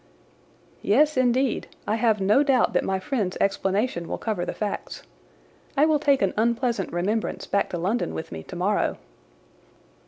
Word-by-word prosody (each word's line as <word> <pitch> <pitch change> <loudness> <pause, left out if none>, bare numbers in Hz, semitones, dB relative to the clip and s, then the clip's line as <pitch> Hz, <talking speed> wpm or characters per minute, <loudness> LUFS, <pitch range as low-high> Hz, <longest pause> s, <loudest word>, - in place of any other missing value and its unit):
"Yes, 295 +9 +3
indeed. 255 0 +1 0.2
I - - 0
have 220 -2 +2
no 205 +8 +4
doubt 270 -4 +2
that - - +2
my 190 0 -1
friend's 190 -2 -2
explanation 195 -1 0
will - - -3
cover 205 -6 -2
the - - -1
facts. 210 -2 -4 0.7
I 290 - +6
will 310 -1 +3
take 280 -5 +3
an 195 - +1
unpleasant 235 -2 0
remembrance 200 +6 -2
back 200 - 0
to 175 - -3
London 195 +8 -1
with 160 - -6
me 80 -1 -6
tomorrow." - - -1
215 Hz, 155 wpm, -25 LUFS, 190-255 Hz, 0.7 s, I